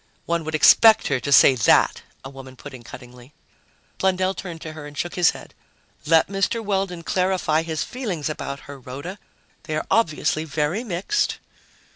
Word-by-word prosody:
"One 170 -1 -1
would 160 0 -3
expect 220 +7 +6
her 135 -3 0
to 140 +4 -5
say 140 - +7
that," 120 - +3 0.2
a - - -6
woman 135 -1 -12
put - - -11
in 125 - -10
cuttingly. 125 +2 -13 0.6
Blundell 190 0 +1
turned 175 -4 -8
to 155 - -7
her 155 -2 -9
and 145 0 -13
shook 175 - -3
his 175 -2 +4
head. - - -8 0.5
"Let 165 0 +4
Mr. 195 +4 -1
Weldon 190 -4 -2
clarify 180 -4 0
his 160 -1 -3
feelings 205 - -4
about 140 -2 -5
her, 140 -1 -11
Rhoda. 140 +10 -8 0.5
They 155 - -4
are 155 - -2
obviously 155 -6 +1
very 155 +7 -2
mixed." 205 - -1
160 Hz, 170 wpm, -22 LUFS, 140-185 Hz, 0.6 s, say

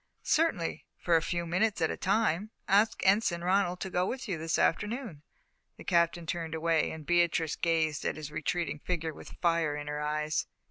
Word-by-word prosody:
"Certainly, 300 - 0
for 170 - +2
a 165 - +4
few 170 +1 -2
minutes 190 +5 +1
at 160 - +1
a - - -3
time. 205 -1 +1 0.2
Ask 205 +2 +3
Ensign 190 -3 +3
Ronald 180 -1 +1
to 190 - -4
go 180 - +1
with 260 -1 -4
you 180 -6 -2
this 160 +1 0
afternoon." 210 - 0 0.6
The - - -10
Captain 170 -1 +2
turned 165 -1 -3
away, 160 0 +1
and 160 -1 -8
Beatrice 170 -2 +2
gazed 160 -3 0
at - - -1
his 150 -1 -7
retreating 155 0 -2
figure 165 -1 -3
with - - -12
fire 165 -3 +2
in 145 0 -5
her 150 0 -4
eyes. 150 +1 -1
170 Hz, 185 wpm, -30 LUFS, 160-185 Hz, 0.6 s, a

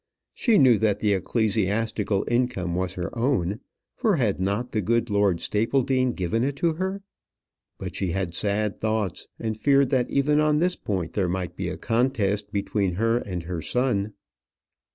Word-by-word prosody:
She 230 -4 +3
knew 125 -6 +6
that 110 -2 +1
the 105 -2 +2
ecclesiastical 105 0 0
income 120 -8 0
was 90 0 -2
her 90 +5 -4
own; 115 -6 0 0.4
for 220 -6 +2
had 110 - 0
not 100 +6 -1
the 110 - 0
good 115 +3 0
Lord 100 -4 +2
Stapledean 130 +3 +1
given 100 +5 -1
it 140 +1 -1
to 165 +3 +1
her? 190 +4 -3 0.7
But - - -6
she 95 - -1
had 95 -1 -2
sad 105 +2 -1
thoughts, 110 -4 -1
and 110 -1 -3
feared 135 +4 +3
that 125 -3 +1
even 150 +2 +2
on 150 0 +3
this 180 +3 +1
point 90 -5 -3
there 95 -4 0
might 90 -1 -3
be - - -3
a - - -5
contest 115 -4 0
between 100 -2 -1
her 115 +4 +2
and 90 -7 -5
her 85 -1 -4
son. 110 -4 0
110 Hz, 170 wpm, -25 LUFS, 95-130 Hz, 0.7 s, knew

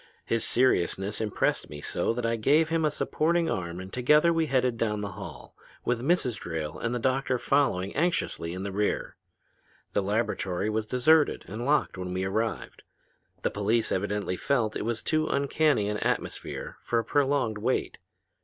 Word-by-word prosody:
His 115 -1 0
seriousness 100 -4 +1
impressed 105 -2 0
me 75 0 -8
so - - -1
that 120 0 -2
I 115 0 +1
gave 150 +8 +3
him 165 0 +1
a 155 - +3
supporting 165 +3 0
arm 85 -2 -3
and 95 +1 -9
together 150 +7 +4
we 165 -1 +1
headed 130 -3 +2
down 105 -2 -1
the 100 -1 -4
hall, - - -10 0.3
with 120 -1 0
Mrs. 135 -5 +1
Drayle 80 -2 -4
and 115 +1 -1
the - - +1
doctor 130 +1 +1
following 120 -9 +1
anxiously 150 - 0
in 90 +2 -5
the 100 - -3
rear. 105 +2 -1 0.8
The 100 - +2
laboratory 100 -1 -1
was 110 0 -1
deserted 145 +6 +3
and 115 +6 -5
locked 150 -9 +1
when 90 0 -4
we 95 - -1
arrived. 110 +4 -2 0.6
The - - +1
police 110 +3 +1
evidently 100 -1 -1
felt 115 -3 0
it - - -3
was 115 -1 -2
too 155 0 +1
uncanny 140 -5 +2
an 105 0 -2
atmosphere - - -3
for 120 - -1
a 115 - 0
prolonged 135 -5 +1
wait. 125 +5 -1
115 Hz, 170 wpm, -28 LUFS, 100-140 Hz, 0.8 s, together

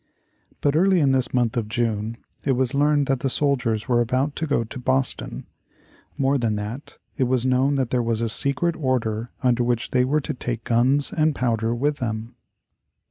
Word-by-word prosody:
But 145 0 +2
early 185 +2 +4
in 140 -4 +3
this 130 -2 +1
month 120 -3 +1
of 115 -3 -1
June 110 -1 -2 0.3
it 135 - +2
was 130 +1 0
learned 145 0 +3
that 135 -1 0
the 135 - -1
soldiers 125 -6 0
were 120 -2 +3
about 130 +5 0
to 160 - -2
go 140 -5 +1
to 120 +4 -8
Boston. 130 +1 -1 0.7
More 135 0 +2
than 115 -3 0
that, 105 +7 -6 0.2
it 130 - +2
was 125 0 +1
known 130 +2 +2
that 130 -4 -1
there 125 - +2
was 115 -1 -1
a 115 - 0
secret 140 +9 0
order 120 -5 -1
under 125 -1 +3
which 120 -1 -1
they 125 -1 +3
were 150 +4 +1
to 150 - -4
take 120 -3 -4
guns 130 +5 +2
and 155 -2 +2
powder 115 -2 0
with 145 +4 0
them. 110 -2 -4
125 Hz, 190 wpm, -23 LUFS, 115-140 Hz, 0.7 s, early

